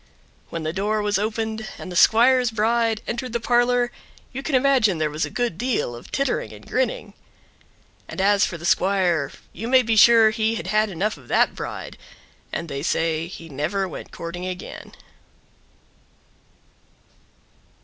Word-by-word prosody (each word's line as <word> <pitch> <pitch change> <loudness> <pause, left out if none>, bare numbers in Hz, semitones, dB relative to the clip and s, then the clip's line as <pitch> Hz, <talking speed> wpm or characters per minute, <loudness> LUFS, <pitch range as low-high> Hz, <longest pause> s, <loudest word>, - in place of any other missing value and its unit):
When 165 -1 -5
the 155 0 -2
door 210 +3 0
was 205 -1 +1
opened 220 +1 -3
and 185 - -8
the - - -6
squire's 245 +6 +5
bride 225 0 +1
entered 240 0 -4
the 235 - 0
parlor 245 +1 +2 0.4
you 265 - -4
can 275 0 -1
imagine 255 -8 +3
there 155 -1 -1
was 155 +2 -1
a - - -7
good 240 -8 -2
deal 240 - -1
of 120 - -12
tittering 275 -1 -1
and - - -13
grinning. - - -1 0.9
And - - -8
as 200 +1 +4
for 170 - -1
the 170 - -9
squire 180 -5 +2 0.2
you 225 +6 -5
may 255 +1 +5
he 225 0 +1
sure 220 0 +7
line 220 +1 +1
had 175 - -5
had 215 +3 +1
enough 200 +4 -2
of - - -17
that - - +3
bride, - - -7 0.5
and 170 - -4
they 140 -2 -4
say 165 +1 0
he 170 -2 -10
never 165 +7 -2
went 170 - -9
courting 175 +2 -6
again. 180 0 -8
215 Hz, 160 wpm, -23 LUFS, 175-235 Hz, 0.9 s, sure